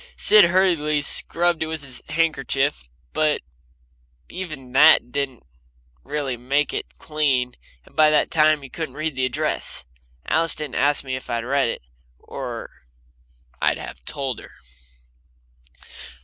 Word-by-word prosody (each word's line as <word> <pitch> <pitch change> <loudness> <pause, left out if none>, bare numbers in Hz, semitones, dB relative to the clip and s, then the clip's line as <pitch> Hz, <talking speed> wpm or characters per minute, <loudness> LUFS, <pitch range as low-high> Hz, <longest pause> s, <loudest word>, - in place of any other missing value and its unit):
Sid 210 -3 +7
hurriedly 170 -5 +2
scrubbed 170 +3 +1
it 160 - 0
with 160 -2 -5
his 130 -2 -8
handkerchief, 140 - 0 0.2
but 155 -1 +1 0.9
even 155 -9 -6
that 140 -2 +6
didn't 135 -3 -3 0.6
really 140 -2 -3
make 135 +5 0
it - - -5
clean, 135 -5 0 0.3
and - - -21
by 155 -1 +6
that 150 -1 +2
time 155 -2 +3
you 135 - -9
couldn't 155 -5 -5
read 155 -1 -2
the 130 0 +1
address. 125 - -2 0.4
Alice 165 0 +2
didn't 150 -4 -5
ask 145 0 +2
me 130 -1 -3
if 130 - -8
I'd 115 -1 -2
read 135 -1 +1
it, - - -5 0.3
or - - -7 0.9
I'd - - +2
have - - -9
told 135 -4 -3
her. - - -13
145 Hz, 135 wpm, -23 LUFS, 130-155 Hz, 0.9 s, Sid